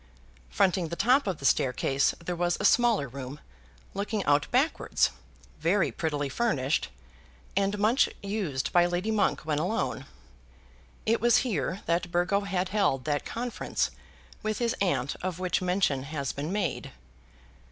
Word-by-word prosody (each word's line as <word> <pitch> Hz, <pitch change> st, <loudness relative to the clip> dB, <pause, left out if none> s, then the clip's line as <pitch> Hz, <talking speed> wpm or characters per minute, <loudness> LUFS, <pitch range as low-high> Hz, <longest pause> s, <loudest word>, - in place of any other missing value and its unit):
Fronting 185 Hz, -, +2 dB
the 170 Hz, -, -4 dB
top 255 Hz, +6 st, +3 dB
of 185 Hz, -4 st, -1 dB
the 135 Hz, -, -7 dB
staircase 135 Hz, +1 st, +2 dB
there 175 Hz, +1 st, -4 dB
was 175 Hz, 0 st, 0 dB
a -, -, -1 dB
smaller 235 Hz, -, +4 dB
room, 135 Hz, +2 st, -7 dB, 0.5 s
looking 205 Hz, 0 st, -2 dB
out 145 Hz, 0 st, +3 dB
backwards, 270 Hz, +6 st, +2 dB, 0.5 s
very 170 Hz, +4 st, +2 dB
prettily 145 Hz, -3 st, -2 dB
furnished, 145 Hz, -, 0 dB, 0.7 s
and 200 Hz, +1 st, +1 dB
much 220 Hz, +6 st, +3 dB
used 195 Hz, -10 st, -2 dB
by 175 Hz, 0 st, +5 dB
Lady 175 Hz, +5 st, -1 dB
Monk 215 Hz, -2 st, +1 dB
when 150 Hz, -1 st, -1 dB
alone. 160 Hz, -6 st, -2 dB, 1.0 s
It 225 Hz, +1 st, +2 dB
was 240 Hz, 0 st, +5 dB
here 185 Hz, -, -2 dB
that 170 Hz, +1 st, 0 dB
Burgo 175 Hz, +3 st, +2 dB
had 190 Hz, -2 st, -1 dB
held 190 Hz, -10 st, +1 dB
that 145 Hz, -2 st, -1 dB
conference 245 Hz, +1 st, -2 dB, 0.5 s
with 215 Hz, 0 st, -2 dB
his 235 Hz, -1 st, 0 dB
aunt 140 Hz, -9 st, 0 dB
of 185 Hz, -2 st, -3 dB
which 185 Hz, 0 st, 0 dB
mention 180 Hz, -7 st, +1 dB
has 140 Hz, -1 st, -3 dB
been 145 Hz, +4 st, -4 dB
made. 170 Hz, -12 st, -2 dB
180 Hz, 145 wpm, -28 LUFS, 145-205 Hz, 1.0 s, by